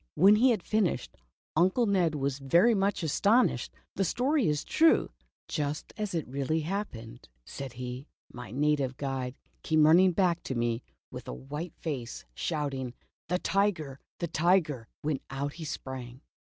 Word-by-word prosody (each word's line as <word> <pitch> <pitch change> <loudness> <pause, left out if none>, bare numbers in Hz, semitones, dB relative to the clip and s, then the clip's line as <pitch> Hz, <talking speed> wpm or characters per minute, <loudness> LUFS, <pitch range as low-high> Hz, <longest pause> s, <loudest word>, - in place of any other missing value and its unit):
When 200 +5 +7
he 255 +4 +5
had 220 -7 +1
finished. 215 -4 0 0.4
Uncle 185 +9 +3
Ned 180 -6 +2
was 140 -1 -1
very 170 - +4
much 195 -3 +1
astonished. 205 - +2 0.3
"The 195 - +2
story 260 - +1
is 150 -1 0
true, 325 0 +3 0.4
just 150 -1 -3
as 210 -4 -3
it 160 - -2
really 140 +5 -1
happened," 125 - -5 0.2
said 135 -3 -7
he. 125 +3 -6
" - - -28
My 125 0 -8
native 140 0 0
guide 135 -2 -3 0.3
came 155 -1 +4
running 180 +4 +6
back 175 -2 +2
to 130 - -3
me 120 0 0 0.3
with - - -8
a - - -4
white 150 - -6
face, 130 -8 -5
shouting 135 - -3 0.2
' - - -71
the 180 - +2
tiger, 180 -9 0 0.2
the 170 - -2
tiger! 155 -7 +2
' - - -73
when 145 -2 0
out 140 +1 -3
he 165 - -7
sprang. 130 -3 -6
150 Hz, 165 wpm, -29 LUFS, 135-185 Hz, 0.4 s, When